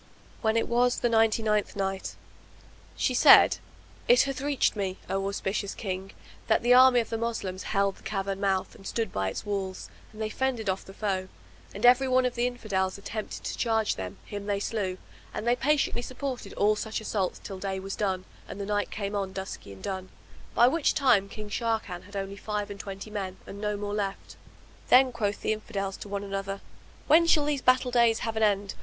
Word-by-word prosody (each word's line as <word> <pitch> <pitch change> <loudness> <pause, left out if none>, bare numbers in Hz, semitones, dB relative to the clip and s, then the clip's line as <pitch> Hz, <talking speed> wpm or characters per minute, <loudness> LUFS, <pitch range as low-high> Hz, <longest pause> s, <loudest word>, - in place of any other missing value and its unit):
When 220 0 +2
it 230 - +1
was 245 +1 +2
the 240 - +2
Ninety 225 0 +3
ninth 210 -1 +1
Night, 195 -1 -3 0.8
She 255 - +1
said, 245 - +7 0.5
It - - +7
hath 275 -1 -3
reached 280 -4 +1
me, 190 -2 -2
O 195 0 -1
auspicious 200 0 -2
King, 190 -1 -5 0.3
that 220 - +3
the 245 +1 +5
army 255 0 +7
of 225 - -7
the 225 - -1
Moslems 210 -5 -3
held 200 0 +1
the - - -18
cavern 195 -1 -3
mouth 195 -2 0
and 195 - -11
stood 225 -4 -2
by 95 0 0
its 95 - -6
walls 195 -2 -3 0.2
and 215 - -14
they 220 - -1
fended 250 -5 -1
off 190 - -5
the 195 - -13
foe, 190 -3 -1 0.4
and 205 +4 -2
every 250 +2 +6
one 255 0 +3
of 250 - 0
the 240 0 +1
Infidels 200 -6 -2
attempted 210 +2 -6
to - - -3
charge 225 -2 +1
them, 95 -1 -6
him 205 -1 -6
they 200 -1 0
slew; 200 -3 -2 0.4
and - - -3
they 240 - +4
patiently 275 -1 +1
supported 255 +1 -5
all 210 +1 +3
such 220 +1 -3
assaults 205 -4 -2
till 195 -2 -8
day 190 0 -3
was 195 +1 -5
done 190 -3 -1 0.2
and - - -7
night 205 0 0
came 205 0 -4
on 195 -2 -2
dusky 190 - -6
and 95 -1 -12
dun, 190 -1 -4 0.5
by 240 - +7
which 310 +3 +2
time 235 -9 +3
King 215 0 -7
Sharrkan 220 -5 -2
had 205 +1 -13
only 195 0 -4
five 210 -1 -3
and 200 - -8
twenty 195 +2 -7
men 190 -3 -4
and 200 - -9
no 210 -1 -1
more 205 0 -4
left. 200 -2 -3 0.5
Then 255 +1 +6
quoth 210 -4 -2
the - - +2
Infidels 200 -3 -4
to 205 - -9
one 200 0 -3
another, 195 0 -4 0.5
"When 335 +2 +5
shall 300 -3 +4
these 290 -2 0
battle 255 0 +3
days 235 -2 +4
have 225 -1 -2
an 220 - -1
end? 205 -2 +2
210 Hz, 205 wpm, -28 LUFS, 195-235 Hz, 0.8 s, said